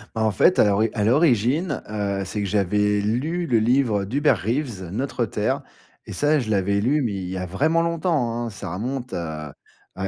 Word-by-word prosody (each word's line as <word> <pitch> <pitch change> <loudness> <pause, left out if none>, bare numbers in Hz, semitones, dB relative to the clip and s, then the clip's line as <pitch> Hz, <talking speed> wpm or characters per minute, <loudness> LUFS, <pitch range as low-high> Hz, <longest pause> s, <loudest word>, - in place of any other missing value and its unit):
Bah, 110 - 0
en 110 - +2
fait, 180 - +3
à - - +7
l'ori 105 +2 +2
à 105 -2 0
l'origine, 140 - +2
heu, 100 -2 -2
c'est 105 +3 -4
que 100 - -1
j'avais 105 +1 +1
lu 145 +12 -1
le 115 -4 +3
livre 115 -3 +2
d'Hubert 140 +9 +1
Reeves 115 - -3
«Notre 125 +2 -2
Terre» 130 +7 -1 0.4
et - - -9
ça, 150 +1 +2
je 115 -4 -4
l'avais 100 0 +1
lu, 145 +6 +2
mais 115 -5 -1
il 95 -2 -4
y 95 - -4
a 90 - -3
vraiment 155 - +1
longtemps, 155 -9 0
hein! - - -4
Ça 95 -3 -7
remonte, 125 +4 -4
à 80 -4 -5 0.4
à 95 +1 -3
110 Hz, 205 wpm, -23 LUFS, 100-135 Hz, 0.4 s, à